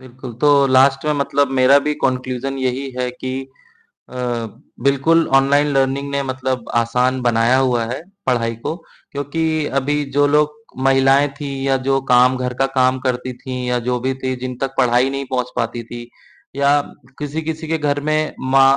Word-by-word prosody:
बिल्कुल, 130 0 -10
तो 145 -1 +5
लास्ट 135 +1 +4
में 150 - +2
मतलब 140 -1 +1
मेरा 130 +2 +6
भी 150 - +2
कॉन्क्लुजन 130 +1 -2
यही 130 +1 -2
है 125 0 -1
कि 130 +1 -6 0.8
अ, - - -12 0.7
बिल्कुल 140 +5 +3
ऑनलाइन 140 +2 +4
लर्निंग 135 +1 0
ने 140 0 0
मतलब 130 -2 -3
आसान 125 +2 +1
बनाया 120 +1 +3
हुआ 125 -3 +1
है, 130 - -4 0.2
पढ़ाई 115 -2 0
को 160 - -2 0.4
क्योंकि 145 +3 -3 0.4
अभी 145 +2 -1
जो 145 0 +4
लोग 150 +1 +2 0.3
महिलाएँ 135 +1 +4
थीं 140 -2 -4
या 135 -1 +2
जो 135 0 +2
काम 125 +1 +5
घर 125 0 -3
का - - +5
काम 130 0 +3
करती 125 0 -2
थीं 130 -1 -6
या 125 0 +1
जो 125 0 0
भी 130 +2 -1
थी 130 0 -1
जिन 130 0 -4
तक 135 0 -2
पढ़ाई 125 0 +3
नहीं 135 0 -4
पहुँच 125 -1 -1
पाती 120 0 -2
थी 120 +1 -9 0.5
या 140 0 +3 0.5
किसी-किसी 160 +2 -4
के 160 +1 0
घर 145 -2 0
में 155 0 0 0.2
मा 135 0 +6
135 Hz, 175 wpm, -19 LUFS, 125-140 Hz, 0.8 s, मेरा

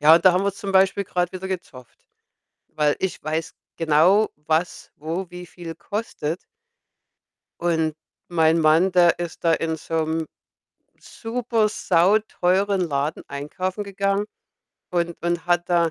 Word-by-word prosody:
Ja, 155 +2 +8
und 170 - +2
da 185 - +8
haben 185 +2 +1
wir 200 - +1
zum 200 -2 -5
Beispiel 195 +1 +3
grad 180 -1 -1
wieder 190 0 -6
gezofft, 145 -10 -8 0.6
weil 150 -1 +1
ich 190 - -3
weiß 160 +1 -2 0.2
genau, 165 +7 +4
was 155 +3 -2
wo 165 +4 -4
wie 180 0 -9
viel 170 -1 -9
kostet 195 -7 -4 1.2
und 160 -2 +1 0.3
mein 165 -1 +3
Mann, 160 +4 +4
der 175 -1 +5
ist 175 -1 -6
da 165 - +4
in 160 0 0
so 160 +1 -2
'nem 160 0 -2 0.7
super 230 -2 -1
sauteuren 195 0 +2
Laden 145 -2 -2
einkaufen 185 +8 -4
gegangen 200 +1 -1 0.6
und 170 -1 0
und 175 0 -1
hat 175 -1 +1
da 170 -2 +3
175 Hz, 140 wpm, -23 LUFS, 160-190 Hz, 1.2 s, Ja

